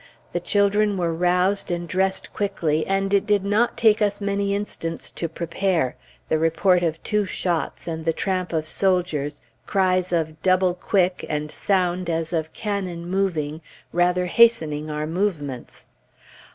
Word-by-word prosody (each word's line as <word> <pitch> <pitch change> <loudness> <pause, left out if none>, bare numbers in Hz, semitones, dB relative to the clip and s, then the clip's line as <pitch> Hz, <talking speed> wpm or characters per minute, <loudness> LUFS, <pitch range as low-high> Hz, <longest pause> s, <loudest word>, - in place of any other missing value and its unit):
The 175 - -1
children 200 +2 +2
were 170 -2 0
roused 180 +3 +1
and 175 -1 -2
dressed 190 +2 0
quickly, 165 -7 -1
and 195 +1 0
it 200 - +3
did 205 -2 +2
not 215 +4 +1
take 220 -2 +4
us 205 -1 +1
many 200 0 0
instants 165 -5 -4
to 170 - -4
prepare, 170 -3 -1 0.3
the 155 - +1
report 175 +3 +3
of 165 -2 -2
two 210 -2 0
shots, 175 -3 -2
and 160 -1 -4
the 165 - +2
tramp 185 +1 -2
of 160 -2 -1
soldiers, 160 -5 0 0.3
cries 185 -2 +1
of 160 -2 -1
"Double 185 -1 +3
quick," 180 0 0
and 150 0 -2
sound 180 -2 0
as 165 +1 -2
of 160 -1 -1
cannon 190 -5 -4
moving, 170 -5 -1 0.3
rather 180 +1 +2
hastening 160 -8 +3
our 150 0 -2
movements. 160 -7 -3
180 Hz, 150 wpm, -23 LUFS, 165-195 Hz, 0.3 s, take